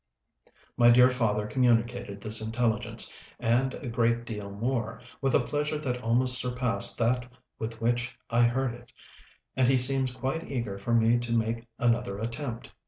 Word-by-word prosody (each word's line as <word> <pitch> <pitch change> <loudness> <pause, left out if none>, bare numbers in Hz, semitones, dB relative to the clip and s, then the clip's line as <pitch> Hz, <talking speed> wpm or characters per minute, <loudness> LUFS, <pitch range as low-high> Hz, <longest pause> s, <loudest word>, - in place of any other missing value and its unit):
My 120 -1 +6
dear 125 +1 +7
father 105 -4 0
communicated 120 -2 0
this 110 +1 +1
intelligence, 115 0 -1 0.3
and 125 +3 +1
a 135 - -8
great 115 0 0
deal 105 -3 -6
more, 115 +2 -3 0.2
with 135 -2 +1
a - - +6
pleasure 150 +5 -2
that 125 -4 -3
almost 125 +2 +3
surpassed 125 -1 +3
that 125 +1 0 0.3
with 115 0 -5
which 120 +2 -1
I 120 0 +3
heard 130 0 -1
it, 120 0 -14 0.6
and 130 -2 +3
he 135 0 +4
seems 130 0 0
quite 130 +6 -4
eager 115 -7 -4
for 115 +4 0
me 115 +1 +3
to 120 -1 -5
make 115 +1 -2
another 115 -4 0
attempt. 115 +2 -5
120 Hz, 160 wpm, -28 LUFS, 115-125 Hz, 0.6 s, dear